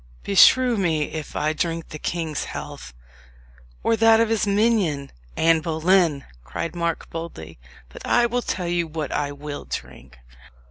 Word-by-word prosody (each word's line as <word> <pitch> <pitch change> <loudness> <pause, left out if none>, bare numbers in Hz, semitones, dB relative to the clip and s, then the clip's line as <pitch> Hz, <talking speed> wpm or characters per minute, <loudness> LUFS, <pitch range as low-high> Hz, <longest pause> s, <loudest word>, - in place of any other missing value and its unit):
"Beshrew 245 +4 +5
me 160 -6 0
if 155 -1 -6
I 155 +1 0
drink 165 +1 -3
the 155 - -8
king's 160 -3 -3
health, - - -8 0.9
or 230 - +3
that 225 0 +5
of 230 -1 +2
his 225 -2 +1
minion, 200 -9 +1 0.3
Anne 165 0 +4
Boleyn!" 160 -2 +2 0.2
cried 105 - -5
Mark 170 -1 -2
boldly. 80 - -8 0.3
"But - - -12
I 240 - +3
will 245 +1 0
tell 180 -6 -3
you 170 -1 0
what 155 -2 -4
I 145 -1 -1
will 145 0 -7
drink. 60 - -8
165 Hz, 150 wpm, -23 LUFS, 150-200 Hz, 0.9 s, Beshrew